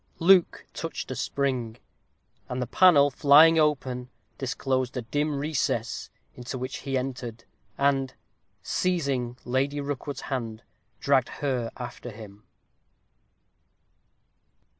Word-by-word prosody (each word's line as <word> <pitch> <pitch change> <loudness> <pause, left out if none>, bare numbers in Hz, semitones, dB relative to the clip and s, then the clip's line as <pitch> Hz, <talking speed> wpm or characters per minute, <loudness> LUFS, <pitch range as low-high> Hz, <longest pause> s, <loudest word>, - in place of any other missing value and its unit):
Luke 180 +1 +4
touched - - -5
a - - -3
spring, 125 -5 -2 0.7
and 125 - -3
the 125 - -1
panel 145 0 +5
flying 155 +4 +6
open, 130 -5 0 0.3
disclosed 130 -1 -1
a 125 - -3
dim 145 +6 -1
recess, 140 -6 -2 0.2
into 125 +1 -6
which 130 +2 -4
he 135 -1 -2
entered; 125 -3 -5 0.3
and, 135 -2 +1 0.5
seizing 140 -9 -1
Lady 135 +3 0
Rookwood's 140 0 -4
hand, 115 -4 -4 0.4
dragged 135 -3 +2 0.2
her 125 -4 0
after 120 0 -7
him. 105 -2 -11
130 Hz, 105 wpm, -26 LUFS, 125-145 Hz, 0.7 s, flying